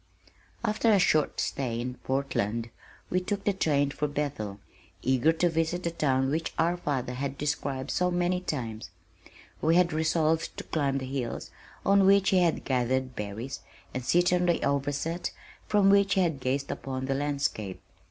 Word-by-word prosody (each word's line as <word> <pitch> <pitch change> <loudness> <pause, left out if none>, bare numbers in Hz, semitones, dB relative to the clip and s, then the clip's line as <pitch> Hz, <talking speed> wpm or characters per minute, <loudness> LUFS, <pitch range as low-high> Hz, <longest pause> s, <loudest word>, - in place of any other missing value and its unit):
After 220 +1 +2
a 205 - +6
short 155 -5 +2
stay 120 -4 -1
in 125 +1 -3
Portland 115 -4 -1 0.4
we 180 - +3
took 200 +2 -3
the 205 - +2
train 145 -6 +1
for 150 - -1
Bethel, 140 -9 -3 0.4
eager 130 +4 +3
to 170 +2 +2
visit 165 +2 0
the 170 - -1
town 135 -4 +1
which 160 +2 -2
our 170 +2 +2
father 135 -7 -2
had 135 +1 -3
described 140 -2 -2
so 180 0 +1
many 180 +1 0
times. 115 -10 -4 0.7
We 160 +2 +3
had 175 -2 +4
resolved 160 0 +1
to - - -5
climb 140 -3 0
the 130 - -3
hills 130 -2 -4 0.3
on 200 -1 +5
which 195 -1 +5
he 190 - +5
had 170 -2 +1
gathered 130 0 0
berries 105 +6 -5 0.3
and 130 - -3
sit 175 +7 +3
on 180 0 +2
the 170 - +2
"Overset" 145 +5 -1 0.4
from 200 -2 +4
which 200 0 +4
he 190 - +4
had 165 -6 0
gazed 135 +2 -1
upon 130 -1 -4
the 135 - 0
landscape. 140 -9 -2
145 Hz, 170 wpm, -28 LUFS, 130-175 Hz, 0.7 s, a